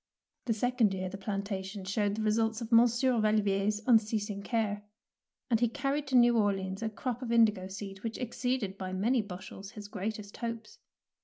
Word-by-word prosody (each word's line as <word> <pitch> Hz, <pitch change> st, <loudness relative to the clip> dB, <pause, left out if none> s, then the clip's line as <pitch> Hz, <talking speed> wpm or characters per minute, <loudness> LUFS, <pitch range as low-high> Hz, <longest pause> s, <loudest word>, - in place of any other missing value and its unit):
The 225 Hz, -, +1 dB
second 235 Hz, -3 st, +2 dB
year 185 Hz, 0 st, -3 dB
the 195 Hz, -, -7 dB
plantation 195 Hz, -1 st, -4 dB
showed 205 Hz, +1 st, 0 dB
the 220 Hz, -, -2 dB
results 220 Hz, +1 st, +1 dB
of 230 Hz, -1 st, -6 dB
Monsieur 240 Hz, +1 st, +4 dB
Val 215 Hz, 0 st, +3 dB
vier's 205 Hz, +1 st, +1 dB
unceasing 215 Hz, -3 st, +2 dB
care, 210 Hz, -1 st, -1 dB, 0.7 s
and 225 Hz, -, +4 dB
he 240 Hz, -1 st, +3 dB
carried 280 Hz, +3 st, -2 dB
to 265 Hz, -, 0 dB
New 240 Hz, 0 st, +6 dB
Orleans 195 Hz, -2 st, 0 dB
a 225 Hz, -, -1 dB
crop 245 Hz, +3 st, -4 dB
of 240 Hz, -2 st, -4 dB
indigo 215 Hz, -5 st, +4 dB
seed 195 Hz, 0 st, -7 dB
which 225 Hz, -1 st, -3 dB
exceeded 245 Hz, -4 st, -2 dB
by 185 Hz, -1 st, -4 dB
many 230 Hz, +6 st, +2 dB
bushels 195 Hz, +1 st, -9 dB
his 210 Hz, -2 st, -8 dB
greatest 205 Hz, 0 st, -5 dB
hopes. 230 Hz, -2 st, -5 dB
215 Hz, 175 wpm, -31 LUFS, 200-235 Hz, 0.7 s, New